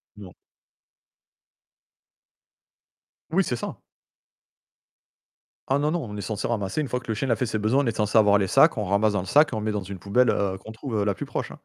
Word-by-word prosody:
Non. 100 Hz, -4 st, -11 dB, 3.0 s
Oui, 190 Hz, +4 st, +3 dB
c'est 125 Hz, -, -2 dB
ça. -, -, -6 dB, 1.9 s
Ah 135 Hz, -, +2 dB
non, 150 Hz, +2 st, 0 dB
non, 170 Hz, -2 st, -1 dB
on 105 Hz, -4 st, -7 dB
est -, -, -4 dB
censé 105 Hz, 0 st, -3 dB
ramasser 105 Hz, +2 st, -2 dB
une 145 Hz, -, -3 dB
fois 125 Hz, -, -2 dB
que -, -, -17 dB
le 110 Hz, -, -1 dB
chien 125 Hz, +6 st, -3 dB
il -, -, 0 dB
a -, -, +4 dB
fait 125 Hz, -, -1 dB
ses 110 Hz, -2 st, -2 dB
besoins, 115 Hz, +7 st, +2 dB
on -, -, -2 dB
est 115 Hz, -, -1 dB
censé 105 Hz, +1 st, +1 dB
avoir 105 Hz, -2 st, +6 dB
les 100 Hz, -1 st, 0 dB
sacs. 135 Hz, -, +4 dB
On 105 Hz, -, -1 dB
ramasse 100 Hz, +2 st, +2 dB
dans 100 Hz, -, 0 dB
le 90 Hz, -, -5 dB
sac, 150 Hz, +10 st, +4 dB
et -, -, -3 dB
on 110 Hz, -, -2 dB
met 110 Hz, 0 st, -1 dB
dans 105 Hz, -2 st, -3 dB
une 95 Hz, 0 st, -8 dB
poubelle 115 Hz, +6 st, +2 dB, 0.3 s
qu'on 110 Hz, -, -9 dB
trouve 110 Hz, -2 st, -3 dB
la 100 Hz, 0 st, +1 dB
plus -, -, -6 dB
proche. -, -, -4 dB
110 Hz, 220 wpm, -25 LUFS, 100-125 Hz, 3.0 s, avoir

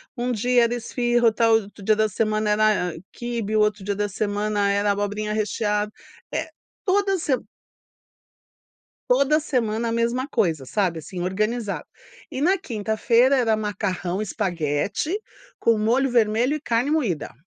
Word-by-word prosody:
um 245 Hz, +1 st, -1 dB
dia 245 Hz, +2 st, +3 dB
era 235 Hz, -, -1 dB
esfirra 240 Hz, 0 st, 0 dB
o 225 Hz, +1 st, +2 dB
outro 200 Hz, 0 st, -14 dB
dia 215 Hz, +1 st, +3 dB
da 215 Hz, 0 st, +2 dB
semana 215 Hz, +1 st, 0 dB
era 210 Hz, -5 st, +2 dB, 0.2 s
quibe 230 Hz, -3 st, -3 dB
o -, -, +4 dB
outro 210 Hz, -2 st, +1 dB
dia 200 Hz, 0 st, -2 dB
da 205 Hz, 0 st, -1 dB
semana 205 Hz, 0 st, 0 dB
era 200 Hz, +1 st, +2 dB
abobrinha 205 Hz, +1 st, -2 dB
recheada, 210 Hz, 0 st, -1 dB, 0.4 s
eh, 320 Hz, -, -2 dB, 0.4 s
toda 390 Hz, 0 st, +2 dB
sema 275 Hz, -6 st, -1 dB, 1.7 s
toda 280 Hz, +4 st, +4 dB
semana 235 Hz, -5 st, -1 dB
a 230 Hz, -, -1 dB
mesma 235 Hz, +4 st, 0 dB
coisa 165 Hz, -, 0 dB
sabe 175 Hz, +2 st, -1 dB
assim 175 Hz, +3 st, -7 dB
organizado. 210 Hz, +4 st, -1 dB, 0.5 s
E 260 Hz, -, -4 dB
na 370 Hz, +6 st, +3 dB
quinta-feira 230 Hz, -, +2 dB
era 225 Hz, -4 st, +2 dB
macarrão 195 Hz, -3 st, -2 dB
espaguete, 195 Hz, -, -1 dB, 0.4 s
com 230 Hz, -1 st, +3 dB
molho 240 Hz, +6 st, +2 dB
vermelho 235 Hz, +3 st, +2 dB
e 305 Hz, -, -3 dB
carne 245 Hz, +2 st, 0 dB
moída. 205 Hz, -, -1 dB
215 Hz, 145 wpm, -23 LUFS, 205-245 Hz, 1.7 s, o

